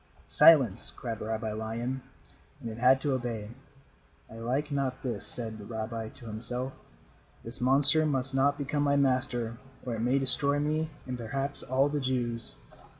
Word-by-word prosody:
"Silence," 130 Hz, -, +4 dB
cried 115 Hz, -3 st, -6 dB
Rabbi 110 Hz, 0 st, -4 dB
Lion, 115 Hz, +4 st, -4 dB, 0.6 s
and 115 Hz, -, -7 dB
it 110 Hz, -, -9 dB
had 130 Hz, +2 st, +4 dB
to 140 Hz, -1 st, -1 dB
obey. 115 Hz, -4 st, -4 dB, 0.8 s
"I 115 Hz, -, -10 dB
like 135 Hz, +6 st, -3 dB
not 135 Hz, -2 st, -3 dB
this," 125 Hz, -3 st, -4 dB
said 110 Hz, -3 st, -4 dB
the -, -, -10 dB
rabbi 110 Hz, +1 st, -6 dB
to 120 Hz, -, -16 dB
himself. 120 Hz, +4 st, -6 dB, 0.7 s
"This 115 Hz, +2 st, -1 dB
monster 140 Hz, +5 st, +8 dB
must 135 Hz, -3 st, +1 dB
not 140 Hz, +2 st, +1 dB
become 145 Hz, +1 st, -3 dB
my 140 Hz, -1 st, +1 dB
master, 125 Hz, -4 st, -1 dB, 0.3 s
or 125 Hz, -, -3 dB
it 115 Hz, -, -5 dB
may 125 Hz, +3 st, +1 dB
destroy 140 Hz, +1 st, +5 dB
me 155 Hz, +2 st, -1 dB, 0.2 s
and 125 Hz, -1 st, -6 dB
perhaps 135 Hz, +5 st, -3 dB
all 130 Hz, +2 st, +1 dB
the 145 Hz, 0 st, -2 dB
Jews." 120 Hz, -3 st, -3 dB
125 Hz, 160 wpm, -28 LUFS, 115-140 Hz, 0.8 s, monster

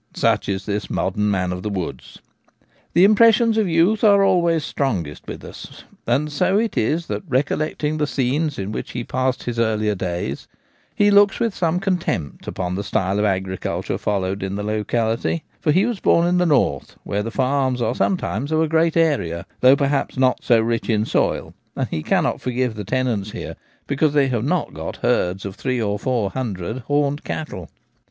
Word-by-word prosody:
Such -, -, +1 dB
is 95 Hz, 0 st, -2 dB
this 105 Hz, 0 st, -3 dB
modern 105 Hz, +2 st, 0 dB
man 90 Hz, -2 st, 0 dB
of 90 Hz, -, -5 dB
the 105 Hz, -, -3 dB
woods. 95 Hz, -4 st, -5 dB, 0.8 s
The 175 Hz, -, +5 dB
impressions 225 Hz, +2 st, +5 dB
of 220 Hz, -3 st, +2 dB
youth 170 Hz, +7 st, +3 dB
are 200 Hz, -2 st, +6 dB
always 170 Hz, -4 st, +2 dB
strongest 90 Hz, -, -3 dB
with -, -, -7 dB
us, -, -, -11 dB, 0.2 s
and 140 Hz, +6 st, +1 dB
so 185 Hz, +7 st, +2 dB
it 225 Hz, +1 st, 0 dB
is 160 Hz, +10 st, 0 dB
that -, -, -4 dB
recollecting 150 Hz, +3 st, 0 dB
the 150 Hz, -1 st, 0 dB
scenes 145 Hz, +3 st, -1 dB
in 95 Hz, +1 st, -4 dB
which -, -, -5 dB
he 120 Hz, -, -3 dB
passed 130 Hz, +1 st, -1 dB
his 120 Hz, -1 st, -3 dB
earlier 110 Hz, -2 st, +1 dB
days 85 Hz, -7 st, -4 dB, 0.5 s
he 205 Hz, 0 st, +4 dB
looks 200 Hz, 0 st, +5 dB
with 230 Hz, -3 st, 0 dB
some 170 Hz, -1 st, 0 dB
contempt 175 Hz, -, -2 dB
upon 90 Hz, -1 st, -3 dB
the 100 Hz, +2 st, -3 dB
style 100 Hz, -1 st, 0 dB
of 105 Hz, -, +2 dB
agriculture 95 Hz, -2 st, -2 dB
followed 100 Hz, -1 st, -1 dB
in 95 Hz, 0 st, -3 dB
the 105 Hz, -, -3 dB
locality; 110 Hz, +7 st, -1 dB, 0.2 s
for 150 Hz, -, +1 dB
he 185 Hz, +7 st, +3 dB
was 235 Hz, -4 st, -2 dB
born 170 Hz, 0 st, +3 dB
in 180 Hz, +1 st, +2 dB
the 180 Hz, -, +2 dB
north, 145 Hz, -4 st, +1 dB
where 100 Hz, -, -2 dB
the 110 Hz, -, -3 dB
farms 130 Hz, 0 st, 0 dB
are 115 Hz, 0 st, 0 dB
some 185 Hz, -, +1 dB
times 145 Hz, -3 st, -3 dB
of 155 Hz, -, +2 dB
a 160 Hz, -, +2 dB
great 160 Hz, +1 st, +2 dB
area, 115 Hz, -, +1 dB
though 130 Hz, +2 st, +7 dB
perhaps 140 Hz, -1 st, -1 dB
not 130 Hz, -1 st, +2 dB
so 120 Hz, -2 st, +4 dB
rich 115 Hz, +1 st, -1 dB
in 110 Hz, -1 st, +2 dB
soil, -, -, 0 dB, 0.2 s
and -, -, -2 dB
he 80 Hz, -, -3 dB
cannot -, -, 0 dB
forgive 125 Hz, -1 st, -1 dB
the 105 Hz, -1 st, -6 dB
tenants 115 Hz, -2 st, -1 dB
here -, -, -6 dB, 0.3 s
because 145 Hz, +1 st, +1 dB
they 140 Hz, -2 st, +3 dB
have 120 Hz, -3 st, -1 dB
not 175 Hz, +2 st, -1 dB
got 80 Hz, +1 st, -7 dB
herdsj 90 Hz, +2 st, +1 dB
of 100 Hz, -, -5 dB
three 130 Hz, +1 st, -2 dB
or 105 Hz, -2 st, -1 dB
four 115 Hz, -5 st, -1 dB
hundred 110 Hz, -3 st, -4 dB
horned 145 Hz, 0 st, 0 dB
cattle. 100 Hz, -, -5 dB
130 Hz, 190 wpm, -21 LUFS, 105-160 Hz, 0.8 s, though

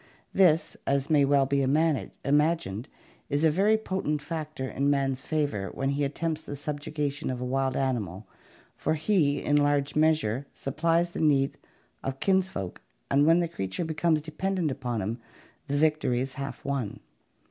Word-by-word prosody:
This, 170 Hz, -4 st, +4 dB
as 140 Hz, +2 st, +1 dB
may 145 Hz, -2 st, +5 dB
well 140 Hz, -1 st, +4 dB
be 140 Hz, +1 st, +1 dB
imagined, 150 Hz, -, +1 dB, 0.4 s
is 145 Hz, +2 st, 0 dB
a 160 Hz, -, +5 dB
very 205 Hz, +7 st, +3 dB
potent 190 Hz, -8 st, -2 dB
factor 150 Hz, -3 st, -5 dB
in 140 Hz, +2 st, 0 dB
man's 135 Hz, -2 st, +1 dB
favor 145 Hz, -, -1 dB
when 135 Hz, -, -1 dB
he 145 Hz, +1 st, 0 dB
attempts 160 Hz, +3 st, -2 dB
the 145 Hz, -, -7 dB
subjuga 145 Hz, 0 st, -3 dB
tion 140 Hz, +3 st, -5 dB
of 125 Hz, -1 st, -3 dB
a 125 Hz, -, -3 dB
wild 135 Hz, +1 st, 0 dB
animal, 110 Hz, -8 st, -2 dB, 0.5 s
for 155 Hz, -, 0 dB
he, 155 Hz, -3 st, +2 dB
in 145 Hz, -, +3 dB
large 145 Hz, 0 st, +2 dB
measure, 150 Hz, -5 st, +2 dB
supplies 165 Hz, +5 st, 0 dB
the -, -, -4 dB
need 140 Hz, -3 st, +3 dB, 0.5 s
of 135 Hz, 0 st, -4 dB
kinsfolk 190 Hz, -, 0 dB, 0.3 s
and 140 Hz, +2 st, +4 dB
when 165 Hz, +2 st, +5 dB
the 170 Hz, -, 0 dB
creature 95 Hz, -, -3 dB
becomes 160 Hz, -1 st, +1 dB
dependent 165 Hz, +1 st, -1 dB
upon 125 Hz, -5 st, -3 dB
him 115 Hz, +5 st, -3 dB, 0.5 s
the 145 Hz, 0 st, 0 dB
victory 150 Hz, -5 st, +2 dB
is 130 Hz, +1 st, -3 dB
half 140 Hz, 0 st, -6 dB
won. 135 Hz, -7 st, -2 dB
145 Hz, 160 wpm, -28 LUFS, 135-160 Hz, 0.5 s, may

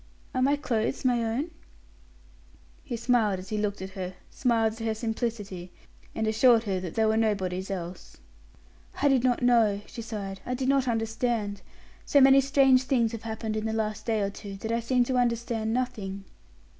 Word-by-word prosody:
"Are 255 Hz, -, 0 dB
my 280 Hz, +3 st, +4 dB
clothes 250 Hz, -2 st, -2 dB
my 240 Hz, -2 st, +2 dB
own?" 250 Hz, +9 st, -2 dB, 1.3 s
He 240 Hz, -4 st, -4 dB
smiled 230 Hz, -4 st, +2 dB
as 185 Hz, +1 st, -9 dB
he 215 Hz, -, -1 dB
looked 205 Hz, -2 st, -2 dB
at 190 Hz, -, -7 dB
her; 185 Hz, -1 st, -6 dB, 0.2 s
smiled 225 Hz, -3 st, +1 dB
at 225 Hz, -, -12 dB
her 225 Hz, -1 st, -1 dB
simplicity, 220 Hz, -5 st, -4 dB, 0.4 s
and 220 Hz, -, -1 dB
assured 225 Hz, +1 st, +4 dB
her 195 Hz, -4 st, -1 dB
that 180 Hz, -3 st, -6 dB
they 220 Hz, -, +3 dB
were 220 Hz, 0 st, +2 dB
nobody's 190 Hz, -4 st, 0 dB
else. 180 Hz, -2 st, -6 dB, 0.9 s
"I 285 Hz, -, +5 dB
did 260 Hz, -3 st, +3 dB
not 250 Hz, -1 st, +1 dB
know," 225 Hz, -5 st, +4 dB
she 230 Hz, -, -8 dB
sighed; 200 Hz, -4 st, -6 dB
"I 250 Hz, -, -3 dB
did 260 Hz, +1 st, -1 dB
not 275 Hz, -2 st, +2 dB
understand. 225 Hz, -3 st, -1 dB, 0.4 s
So 285 Hz, -, +4 dB
many 270 Hz, 0 st, +7 dB
strange 270 Hz, -1 st, +4 dB
things 240 Hz, -3 st, +2 dB
have 230 Hz, -2 st, -6 dB
happened 220 Hz, -1 st, -4 dB
in 215 Hz, 0 st, -2 dB
the 220 Hz, -, -2 dB
last 215 Hz, 0 st, -2 dB
day 220 Hz, -2 st, +1 dB
or 200 Hz, 0 st, -1 dB
two, 200 Hz, 0 st, -8 dB
that 220 Hz, +3 st, -4 dB
I 230 Hz, -, +1 dB
seem 245 Hz, +2 st, +2 dB
to 255 Hz, +1 st, -1 dB
understand 235 Hz, -2 st, 0 dB
nothing." 210 Hz, -6 st, -3 dB
225 Hz, 185 wpm, -27 LUFS, 205-245 Hz, 1.3 s, many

